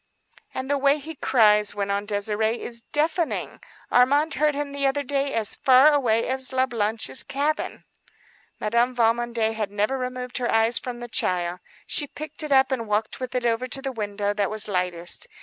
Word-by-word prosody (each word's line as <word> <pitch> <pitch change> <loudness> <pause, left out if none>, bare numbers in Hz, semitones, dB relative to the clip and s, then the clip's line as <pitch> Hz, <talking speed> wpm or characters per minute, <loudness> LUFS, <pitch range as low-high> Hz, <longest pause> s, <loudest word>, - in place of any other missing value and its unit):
"And 260 - -4
the 285 0 0
way 280 +1 +3
he 310 +2 -8
cries," 210 -7 +3
went 200 -1 -2
on 200 +1 -2
Désirée, 215 +2 0
"is 235 -1 -4
deafening. 315 +2 -1 0.3
Armand 285 +5 +3
heard 300 0 +1
him 290 0 -3
the 280 -1 0
other 285 +1 0
day 275 +1 -1
as 220 -2 +1
far 265 +3 +6
away 230 -5 +2
as 260 0 -3
La 260 0 +2
Blanche's 220 - 0
cabin." 290 +3 -2 0.8
Madame 235 +4 +1
Valmondé 230 -1 +1
had 215 -2 -3
never 210 +6 -1
removed 250 0 -4
her 245 - -1
eyes 225 +1 +4
from 245 -1 -7
the 240 - -6
child. 180 -5 -1 0.3
She 290 -2 -1
lifted 310 0 -5
it 265 0 +4
and 230 -4 -2
walked 210 +1 -1
with 255 0 -5
it 250 -1 -1
over 235 +2 0
to 270 - 0
the 270 0 -4
window 205 -3 -2
that 205 -2 -1
was 215 0 0
lightest. 180 - -2
240 Hz, 185 wpm, -24 LUFS, 215-275 Hz, 0.8 s, far